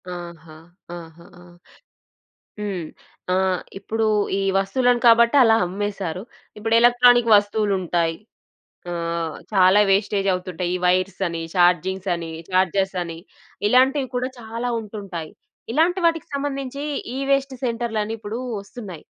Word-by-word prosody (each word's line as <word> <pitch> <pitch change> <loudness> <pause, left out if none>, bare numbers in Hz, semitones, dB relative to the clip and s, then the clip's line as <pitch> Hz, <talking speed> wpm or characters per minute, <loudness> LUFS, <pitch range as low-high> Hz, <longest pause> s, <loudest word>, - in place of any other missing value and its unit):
ఆహా! 170 -3 -9 0.4
ఆహా! 170 0 -13
ఆ! - - -15 1.2
హ్మ్. 195 -5 -4 0.5
ఆహ్, 185 -1 +1 0.2
ఇప్పుడూ 220 +3 -2 0.3
ఈ - - 0 0.2
వస్తువులను 240 +5 +2
కాబట్టి 235 +2 +6
అలా 225 -2 +5
అమ్మేసారు. 195 -2 -4 0.4
ఇప్పుడు 225 +1 0
ఎలక్ట్రానిక్ 245 -1 +5
వస్తువులుంటాయి, 190 -5 0 0.8
ఆహ్, 170 -1 -3 0.2
చాలా 190 +1 +5
వేస్టేజవుతుంటాయి 190 -3 0
ఈ - - 0
వైర్సని, 185 -2 0
చార్జింగ్సని, 180 -1 +1 0.2
చార్జర్సని, 185 -2 0 0.5
ఇలాంటివి 265 +3 +3
కూడా 250 +1 -1
చాలా 230 +2 -4
ఉంటుంటాయి. 200 -7 -7 0.4
ఇలాంటి 345 +6 +2
వాటికి 330 -1 +1
సంబంధించి 275 -1 -4 0.3
ఈ-వేస్ట్ 275 0 0
సెంటర్లని 225 -2 -2
ఇప్పుడు 215 +2 -5 0.2
ఒస్తున్నాయి. 200 -5 -10
200 Hz, 100 wpm, -22 LUFS, 180-235 Hz, 1.2 s, కాబట్టి